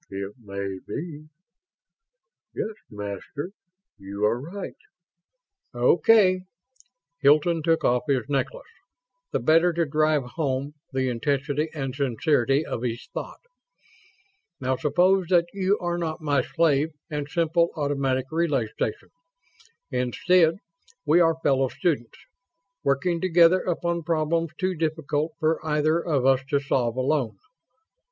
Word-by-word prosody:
"It 100 +1 -5
may 100 -3 -5
be.... 155 -2 -6 1.3
Yes, 220 - -3 0.2
Master, 105 - -6 0.5
you 100 +2 -3
are 115 +3 +1
right." 185 +7 -7 1.0
"Okay." 185 - +4 0.8
Hilton 155 +4 +4
took 165 +1 +1
off 125 0 +3
his 135 -4 0
necklace, 145 - -2 0.7
the - - 0
better 165 +3 +4
to 170 0 +1
drive 155 0 +2
home 135 +1 -3 0.2
the 130 -1 0
intensity 140 +5 -1
and 135 -3 -3
sincerity 135 +1 +1
of 115 - -4
his 120 -1 -4
thought. - - -6 1.2
"Now, 130 -1 0
suppose 175 +6 +2
that 175 -1 +4
you 195 +1 +1
are 175 0 -2
not 160 -2 -3
my 145 -3 +1
slave 155 +1 +1 0.2
and 145 -1 -3
simple 170 +1 +2
automatic 140 -4 0
relay 150 -9 0
station. 110 - -4 0.8
Instead, 160 +7 +2 0.5
we 155 +3 +5
are 165 -1 +4
fellow 135 -1 +3
students, 140 -6 -2 0.7
working 165 +5 +1
together 175 0 +5
upon 170 -1 -1
problems 165 +1 0
too 185 -1 0
difficult 155 -1 -1
for 160 +1 +1
either 155 +2 +1
of 140 -6 0
us 135 -1 +4
to 145 -3 +2
solve 125 -4 0
alone. 130 -1 0
150 Hz, 120 wpm, -25 LUFS, 130-170 Hz, 1.3 s, we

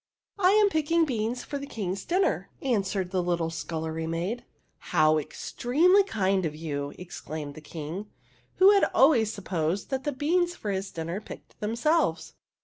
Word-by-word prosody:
'' - - -67
I 365 -2 +5
am 420 -1 +5
picking 325 0 +2
beans 240 -2 -2
for 285 - -5
the 280 - -7
King's 195 -5 -4
dinner," 370 +3 +1
answered 195 -7 0
the 185 -1 +1
little 170 -2 -1
scullery 160 0 -4
maid. 180 +9 -2 0.2
" - - -44 0.2
How 155 0 +5
extremely 320 - +2
kind 195 - 0
of 155 -3 -2
you! 145 -3 -4
" - - -21
exclaimed 155 -4 -7
the 155 - -11
King, 160 +6 -6 0.5
who 380 +2 +7
had 400 -1 +5
always 255 -6 +5
supposed 185 - -2
that 265 0 -1
the 290 - -1
beans 345 +6 +1
for 210 - -4
his 195 0 -2
dinner 170 +4 -4
picked - - -12
themselves. 240 +10 0
200 Hz, 170 wpm, -27 LUFS, -, 0.5 s, who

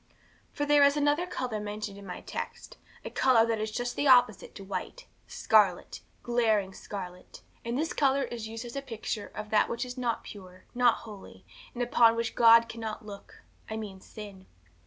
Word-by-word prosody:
'For 290 - -2
there 290 0 +5
is 280 +1 +4
another 295 +4 +1
colour 245 -9 -3
mentioned 210 -1 -5
in 200 -1 -11
my 180 - -7
text, - - -7 0.3
a - - -5
colour 245 -4 +4
which 225 -1 -1
is 215 0 -2
just 245 +2 -3
the 285 - 0
opposite 245 -6 +4
to 195 - -9
white 195 - -6 0.2
scarlet - - +2 0.2
glaring 220 -5 +1
scarlet. 180 -3 -9 0.2
And 235 +1 -2
this 320 +3 -1
colour 275 -1 +2
is 235 -3 -5
used 225 +2 -7
as 235 - -9
a 275 - -2
picture 225 -4 -5
of 210 0 -7
that 215 - +3
which 235 +2 -2
is 250 +1 -7
not 235 -2 -1
pure, 185 -2 -12
not 245 -2 +4
holy, 210 -3 -12 0.3
that 245 - -1
upon 230 -1 +4
which 230 0 -2
God 230 0 +6
cannot 225 -2 -6
look 200 -1 -12 0.3
I 220 - -4
mean 200 -3 -7
sin. 200 -3 -11
230 Hz, 185 wpm, -29 LUFS, 210-245 Hz, 0.3 s, God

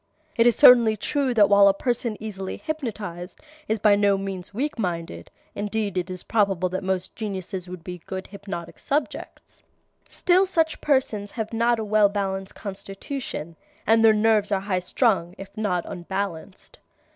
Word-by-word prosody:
It 230 -1 +4
is 240 - +4
certainly 230 -3 +7
true 280 +3 -1
that 210 -3 +6
while 200 0 +6
a 195 - +4
person 235 -1 -2
easily 195 -3 -6
hypnotized 210 - -5 0.3
is 220 - 0
by 210 -1 +4
no 200 -1 +3
means 195 -2 -6
weak 255 +5 -3
minded 170 -4 -4 0.2
(indeed, 205 -1 -2
it 180 0 -2
is 185 -1 -6
probable 195 -5 +1
that 185 +2 -4
most 185 -1 -2
geniuses 190 -4 -5
would 180 -2 -8
be 180 0 -7
good 190 0 -5
hypnotic 200 -4 -8
subjects), 285 0 -4 0.5
still 370 +2 +3
such 325 -3 0
persons 245 -8 0
have 220 0 -5
not 235 +1 +2
a 220 - -3
well 210 -1 +4
balanced 195 -1 -3
constitution 195 - -6 0.3
and 225 0 +4
their 225 - +8
nerves 215 -1 +2
are 195 -1 +1
high 195 -2 -1
strung 180 -2 0
if 195 0 -11
not 185 -5 -1
unbalanced. 190 0 -6
205 Hz, 160 wpm, -24 LUFS, 190-225 Hz, 0.5 s, their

